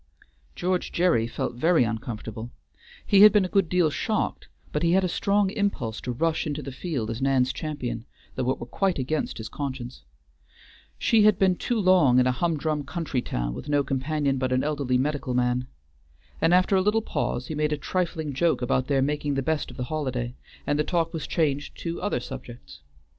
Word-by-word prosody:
George 180 0 -1
Gerry 170 -11 +2
felt 125 +1 -3
very 160 +4 +3
uncomfortable. 110 0 -5 0.6
He 200 -2 +5
had 210 0 +10
been 205 -2 +3
a 185 - -8
good 195 -4 +3
deal 175 -4 +3
shocked, - - -2 0.2
but 150 - -1
he 170 0 +3
had 190 +1 +4
a - - +2
strong 200 +2 +1
impulse 200 - -2
to 125 - -3
rush 160 +6 0
into 145 0 -3
the 135 - -6
field 130 -6 -3
as 115 +3 -5
Nan's 130 -1 +2
champion, 125 -7 -4 0.3
though 130 -1 -1
it 130 - +1
were - - -7
quite 190 +8 0
against 145 +4 -2
his 110 - -5
conscience. 130 -3 -6 1.0
She 225 -2 +3
had 210 -2 +5
been 190 -2 +3
too 235 +5 -1
long 180 -10 +5
in 125 - +5
a 130 - +3
humdrum 155 +1 -1
country 155 -3 -3
town - - -3
with 105 - -7
no 145 -1 +3
companion 140 0 -1
but 130 0 -1
an 130 0 +2
elderly 140 -4 0
medical 135 -1 -1
man. 125 0 +1 0.7
And 165 - +4
after 185 +2 +4
a 190 - +4
little 210 +3 +2
pause 125 - -2
he 155 - -5
made 150 0 0
a 150 - 0
trifling 160 -2 -2
joke 160 0 +1
about 130 +1 +1
their 135 -2 +2
making 145 0 -1
the 135 - 0
best 160 +2 -1
of - - -11
the 125 - -2
holiday, 125 -4 -3 0.3
and 145 0 0
the - - +3
talk 165 0 0
was 160 -3 -4
changed 145 -4 -1
to 170 0 -4
other 205 -8 0
subjects. 120 - -9
145 Hz, 200 wpm, -26 LUFS, 125-170 Hz, 1.0 s, had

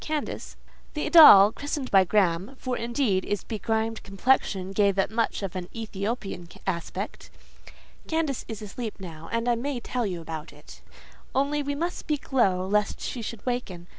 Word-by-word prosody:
Candace" 305 -1 -4 0.4
(the 300 - -1
doll, 215 - +10
christened 285 +1 -4
by 195 -1 +7
Graham; 190 +4 +1
for, 255 -1 -3
indeed, 235 -5 0
its 205 -2 -2
begrimed 225 +1 -2
complexion 195 -2 0
gave 200 0 +2
it 195 - +1
much 225 -2 -1
of 195 -1 -4
an 180 -1 -5
Ethiopian 205 -4 -4 0.2
aspect)—"Candace 280 - -5
is 220 -2 -6
asleep 215 +2 -6
now, 165 -4 -9
and 230 +1 -1
I 240 - +4
may 250 +2 -2
tell 240 -1 -2
you 180 -3 -4
about 160 -1 -7
it; - - -15 0.5
only 285 +2 +1
we 285 0 -3
must 340 +4 -1
both - - -6
speak 295 -2 -4
low, 185 -8 +3
lest 210 +2 0
she 245 - -4
should 225 -1 -7
waken. 245 -9 -3
220 Hz, 165 wpm, -26 LUFS, 190-255 Hz, 0.5 s, doll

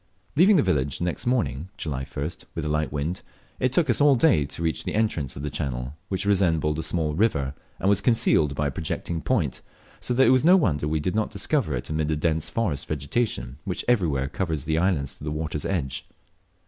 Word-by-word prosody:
Leaving 190 +7 +6
the 150 - +4
village 70 -1 0
the - - -4
next 90 +6 -3
morning 85 - 0
(July 70 -6 -3
1st) 75 +5 -5
with 80 -2 -3
a - - -1
light 75 0 0
wind, 75 +6 -2 0.4
it 130 - +1
took 160 +4 +2
us - - +2
all 145 -1 +6
day 115 - +4
to 75 +4 -6
reach 80 -1 -1
the - - -3
entrance 85 - 0
to - - -8
the 75 +1 -4
channel, 65 -4 -3 0.2
which 95 +1 -2
resembled 80 -6 +2
a - - 0
small 80 -1 0
river, 80 -8 +1 0.2
and - - -1
was 100 0 +4
concealed 80 - +3
by 75 - -1
a 70 - 0
projecting 85 -1 -3
point, - - 0 0.4
so 125 - -2
that 130 +2 +5
it - - +5
was 130 0 +4
no 180 +4 +7
wonder 75 - +1
we 80 +1 0
did 90 +5 -1
not 110 0 0
discover 130 - 0
it - - -5
amid 75 -1 0
the 80 - 0
dense 80 +1 0
forest 85 -7 -1
vegetation 70 - -2
which 90 - -3
everywhere 80 - +2
covers 80 -1 -2
these 80 +1 +1
islands 80 -7 +1
to - - -14
the 75 - -3
water's 75 -1 -3
edge. 70 -9 -2
80 Hz, 220 wpm, -25 LUFS, 75-100 Hz, 0.4 s, no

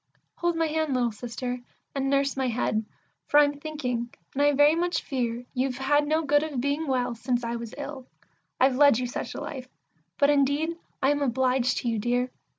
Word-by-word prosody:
Hold 345 -1 0
my 330 0 +1
hand, 315 -3 0
little 240 -2 +1
Sister, 245 +3 -5 0.3
and 270 -1 -1
nurse 275 0 +2
my 265 -1 0
head, 225 -2 0 0.4
for 295 - +5
I'm 290 -1 +3
thinking, 250 -6 -3 0.2
and 280 - -1
I 290 0 +5
very 290 +2 +5
much 345 +1 0
fear 245 -2 -2
You've 255 -1 -1
had 290 +2 +2
no 315 +2 +1
good 290 0 +3
of 300 -4 -3
being 285 +4 -1
well 250 -2 0
since 240 +1 -1
I 235 0 -2
was 230 -1 -7
ill; 280 -3 -7 0.5
I've 260 0 +4
led 285 -4 +6
you 250 - -1
such 245 - -5
a - - -5
life; 260 -4 -6 0.5
but 285 +1 +4
indeed 290 +4 +2 0.3
I 270 - +5
am 290 0 0
obliged 255 -1 +1
to - - -4
you, 225 -2 0
dear! 245 +3 0
270 Hz, 200 wpm, -27 LUFS, 245-290 Hz, 0.5 s, led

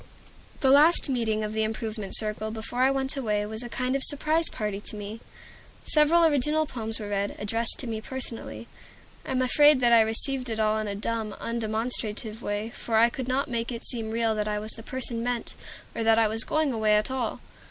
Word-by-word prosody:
The 265 - +4
last 300 +3 +6
meeting 220 -4 -1
of 210 0 -4
the 220 - -1
Improvement 215 -2 -3
Circle 215 0 -1
before 225 +3 -4
I 260 - +5
went 270 0 0
away 210 -6 -1
was 220 +1 -3
a 240 - -6
kind 255 +1 -1
of 275 - +1
surprise 310 +3 +3
party 210 -2 -4
to 215 - -4
me. 210 +2 -7 0.7
Several 320 +3 +4
original 300 +1 +2
poems 225 -5 -5
were 210 -1 -6
read, 200 0 -2
addressed 225 +3 +3
to - - 0
me 220 -1 -4
personally. 255 -1 -6 0.6
I - - -8
am 260 -1 +1
afraid 290 +2 +5
that 240 -1 +4
I 230 - +7
received 250 +4 -1
it 220 -1 -3
all 215 0 +1
in 215 - -3
a 200 - -3
dumb, 220 0 -3
undemonstrative 225 -1 -3
way, 205 +2 -3
for 225 -1 -2
I 235 +1 +5
could 260 0 -5
not 260 +2 0
make 235 -1 -3
it 235 -1 -6
seem 225 -3 -2
real 225 0 0
that 210 -1 -2
I 210 0 -1
was 215 +1 -2
the 225 - -5
person 240 -1 -4
meant, 240 0 -3 0.4
or 230 - -2
that 225 0 +4
I 225 -1 +4
was 220 +1 +1
going 310 -4 0
away 215 -2 +2
at 210 +4 0
all. 255 -4 -3
230 Hz, 215 wpm, -26 LUFS, 215-260 Hz, 0.7 s, I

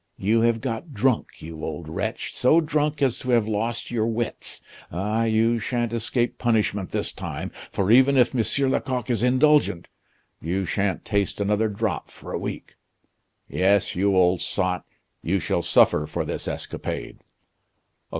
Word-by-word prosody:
You 110 +4 +2
have 115 -1 +2
got 130 +3 -4
drunk, 125 +2 0
you 80 0 -8
old 80 0 -5
wretch, 80 - -3
so 140 +6 +4
drunk 150 -2 0
as 130 -4 +1
to 130 - -6
have 115 -3 +3
lost 115 +3 -2
your 115 -2 0
wits. 115 0 -2 0.3
Ah, 105 +6 0
you 115 +1 +2
shan't 120 +1 -2
escape 120 +1 -1
punishment 105 -5 +1
this - - -2
time, - - -6 0.2
for 100 +2 0
even 130 +3 +6
if 125 -2 +4
M. 130 +3 +2
Lecoq 125 -3 -1
is 115 -4 0
indulgent, 130 - +3 0.5
you 95 +4 -1
shan't 95 +2 -1
taste 100 -1 -1
another 105 +2 +1
drop 105 -3 -2
for - - -9
a - - -1
week. - - -6 0.7
Yes, 100 +1 +2
you 100 +2 +2
old 90 -1 +3
sot, 90 +1 0 0.4
you 95 +4 0
shall 90 - -1
suffer 75 - +3
for - - -3
this - - -3
escapade." - - -5
110 Hz, 155 wpm, -24 LUFS, 95-125 Hz, 0.7 s, even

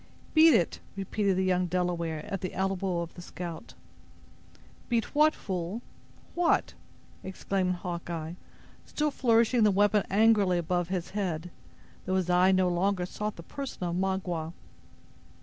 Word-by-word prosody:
"Beat 320 0 +7
it," 170 - +1 0.2
repeated 195 0 0
the 190 - +2
young 180 -1 +1
Delaware 170 -3 -2
at 195 - -4
the 185 - -4
elbow 190 -2 -1
of 170 -1 -6
the 175 - -10
scout. 175 -2 -8 1.1
"Beat 235 -2 0
what, 305 +1 +4
fool!—what?" 200 - -3 0.5
exclaimed 190 -1 -1
Hawkeye, 170 -2 -5 0.5
still 300 0 -1
flourishing 235 -2 +3
the 215 - +6
weapon 205 +1 +3
angrily 205 -3 +4
above 175 +1 -1
his 180 -2 -3
head, 180 -4 -3 0.6
though 185 - +1
his 180 -1 0
eye 180 +1 +5
no 185 -1 +3
longer 180 +1 +1
sought 210 +3 -4
the 170 - -10
person 275 -1 -6
of 175 -1 -1
Magua. 180 -3 -2
185 Hz, 135 wpm, -29 LUFS, 175-205 Hz, 1.1 s, Beat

